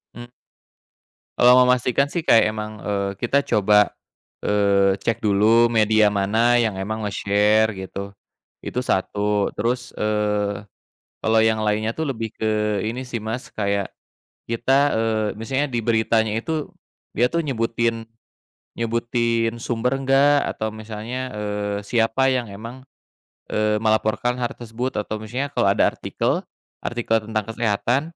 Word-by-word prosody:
Mmm. 120 - -8 1.1
Kalau 125 +1 +7
mau 125 - +6
memastikan, 125 +2 +2
sih, 175 - 0
kayak 115 -7 +5
emang, 105 0 -5
eee, 100 -1 -1
kita 135 +6 +1
coba, 105 -6 +3 0.6
eee, 100 -1 +3
cek 115 -2 0
dulu 110 +3 +4
media 110 -2 +3
mana 110 +5 +2
yang 110 -4 -1
emang 110 +3 -3
nge-share, 105 +1 +2
gitu, 100 +1 -7 0.5
itu - - -3
satu. 105 +1 0
Terus, 120 +3 -1
eee, 105 -1 0 0.6
kalau 110 0 +2
yang 110 -1 +2
lainnya, 110 +1 0
tuh, 160 +6 -3
lebih 115 -5 -4
ke 105 -1 0
ini 125 +4 -4
sih, 125 -2 -5
Mas, 110 +4 -5
kayak 100 -1 -1 0.5
kita, 120 +3 +1 0.2
eee, 110 -1 0
misalnya 135 +5 -1
di 120 - 0
beritanya 110 -1 +1
itu 155 +6 -3 0.5
dia, 125 +1 +2
tuh, 170 - +1
nyebutin 115 -3 -1 0.7
nyebutin 115 0 -1
sumber 120 +2 -1
nggak. 140 +2 +3
Atau 110 0 -4
misalnya, 110 +4 -6
eee, 105 -1 -3
siapa 115 +4 +1
yang 125 -4 -2
emang, 115 +6 -9 0.7
eee, 105 0 0
melaporkan 110 +2 +1
har 120 -1 -2
tersebut. 120 +2 -5
Atau 105 +1 -4
misalnya 120 +6 -4
kalau 100 - +1
ada - - +3
artikel, - - -2 0.4
artikel 115 -2 0
tentang 110 -1 -2
kesehatan, 115 +3 0
110 Hz, 135 wpm, -22 LUFS, 105-120 Hz, 1.1 s, Kalau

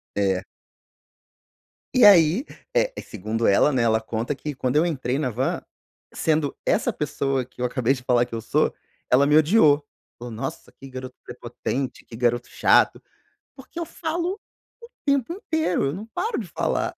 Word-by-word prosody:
É. 95 -2 +1 1.5
E 255 - +5
aí, 175 - +6 0.3
eh, - - +3
segundo 110 +2 -3
ela 100 +9 +4
né, 125 -3 +1
ela 110 -1 +2
conta 115 +4 -3
que 145 0 -6
quando 130 +2 0
eu 155 - +5
entrei 135 -5 -1
na 135 - 0
van, 125 +3 -1 0.5
sendo 155 -3 0
essa - - +2
pessoa 135 -2 -2
que 125 - -13
eu - - +1
acabei 125 +1 +1
de 130 - -7
falar 125 -1 +2
que - - -15
eu 115 - -3
sou, - - +1 0.4
ela 140 +3 +5
me 150 - +5
odiou, 155 -3 +4 0.3
falou 120 0 -8
nossa 120 +5 -6
que 135 - -13
garoto 130 0 -8
prepotente, 125 +2 -5
que 115 - -12
garoto 120 0 0
chato, - - +3 0.6
porque 265 +5 -14
eu 340 - -2
falo 345 +4 -3 0.4
o 470 - -11 0.2
tempo 280 +1 +1
inteiro, 320 - -1
eu 135 - -2
não 200 +6 -6
paro 440 - -2
de 210 - -6
falar. 155 - -2
135 Hz, 170 wpm, -24 LUFS, 120-185 Hz, 1.5 s, aí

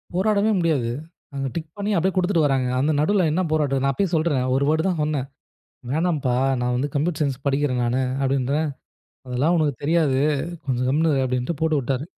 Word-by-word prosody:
போராடவே 210 +2 +2
முடியாது. 150 -9 +1 0.5
அங்கே 135 -1 -2
டிக் 155 -2 -4
பண்ணி 205 +1 -2
அப்படியே 185 +3 +1
குடுத்துட்டு 180 -4 +2
வர்றாங்க. 135 -3 +1
அந்த 150 +4 +2
நடுவுல 185 +1 +2
என்ன 180 +4 +1
போராட்டம். 140 -4 +1
நான் 135 0 +2
அப்பயே 195 +2 0
சொல்றேன். 155 -5 +1
"ஒரு 140 +1 +2
தடவை 160 +1 +2
தான் 170 -5 0
சொன்னேன். 145 -3 -1 0.6
'வேண்ணாம்ப்பா, 150 -6 0 0.3
நான் 125 0 0
வந்து 145 +3 -1
கம்ப்யூட்டர் 155 +2 -1
சயின்ஸ் 135 -2 -1
படிக்கறேன் 135 -3 +1
நானு" 125 +2 0 0.2
அப்படின்றேன். 135 +3 0 0.6
அதெல்லாம் 140 +8 +1
"உனக்கு 150 -4 +1
தெரியாது. 150 -4 +2 0.5
கொஞ்சம் 125 -1 0
கம்முனு 155 +2 +2
இரு" 135 - +1
அப்டின்ட்டு 125 +5 -2
போட்டுவுட்டாரு. 140 -4 0
145 Hz, 170 wpm, -23 LUFS, 135-165 Hz, 0.6 s, போராடவே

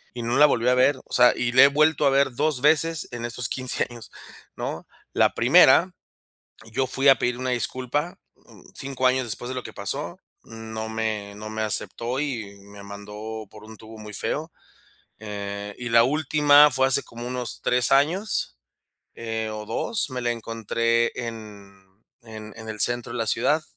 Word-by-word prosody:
Y 120 - -5
no 120 +3 0
la 150 +1 +7
volví 120 -4 0
a - - +4
ver, 130 +2 +3
o - - -13
sea, 125 0 +6
y 120 -1 0
la 130 +1 +6
he - - +8
vuelto 150 +1 +2
a - - +5
ver 135 0 +2
2 145 -1 0
veces 160 +2 +2
en 120 -1 -5
esos 120 +1 -3
15 130 -1 -1
años, 120 -2 -11 0.5
¿no?, - - -5 0.3
la - - +2
primera, - - +5 0.8
yo 130 +3 0
fui 135 +2 +1
a 135 -3 +7
pedir 120 +1 -1
una 130 +1 -3
disculpa, 130 +6 -2 0.2
mm, - - -19
5 135 -1 -2
años 130 0 +2
después 120 +3 -5
de - - -4
lo 125 - -4
que - - -10
pasó, - - -4 0.3
no 110 -1 -7
me 110 -2 -3
no 105 +1 -8
me 110 0 -5
aceptó 115 +4 -3
y 115 -9 -4
me 100 0 -13
mandó 105 +2 -8
por 105 0 -14
un 110 0 -12
tubo 110 +1 -13
muy 105 -1 -10
feo. 155 - -3 0.7
Eh, 100 -1 -6
y 120 - -5
la 115 0 +6
última 150 +1 +5
fue 130 0 +2
hace 135 +1 +2
como 120 +1 -9
unos 125 -2 -5
3 125 -1 +2
años, 165 +10 +1 0.6
eh, 110 -1 -4
o 105 0 -6
2 215 - -1
me 125 -1 -4
la 120 - -1
encontré 115 0 -1
en 105 -4 -8 0.4
en 110 -2 -10
en 110 -1 -9
el 110 -1 -6
centro 120 +1 0
de - - -4
la 115 - -1
ciudad. 150 +9 +1
120 Hz, 185 wpm, -24 LUFS, 110-135 Hz, 0.8 s, he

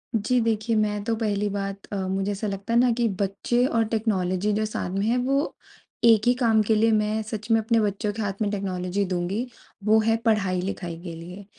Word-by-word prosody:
जी 245 +4 +2
देखिए 225 0 0
मैं 210 -1 0
तो 225 0 0
पहली 210 -2 -1
बात 195 0 -4
अ, - - -1
मुझे 195 +2 -1
ऐसा 205 +2 -3
लगता 200 +3 -4
है 235 - +5
ना 245 0 +4
कि 235 0 +1
बच्चे 240 +5 +1
और 230 -3 +2
टेक्नोलॉजी 205 -3 0
जो 215 +1 0
सामने 195 -1 -2
है 240 +2 +2
वो 275 +4 0 0.5
एक 225 -3 +6
ही 245 - +6
काम 230 -3 +3
के 220 - +4
लिए 225 +1 +3
मैं 215 0 +1
सच 215 0 -6
में 225 - +5
अपने 225 +1 +2
बच्चों 205 0 -1
के 220 - -4
हाथ 200 0 -3
में 205 - +1
टेक्नोलॉजी 190 -1 -2
दूँगी, 185 +5 -2 0.4
वो 220 +1 +5
है 225 +1 +2
पढ़ाई-लिखाई 185 -4 0
के 170 -2 -7
लिए। 180 +4 -10
210 Hz, 205 wpm, -25 LUFS, 195-225 Hz, 0.5 s, एक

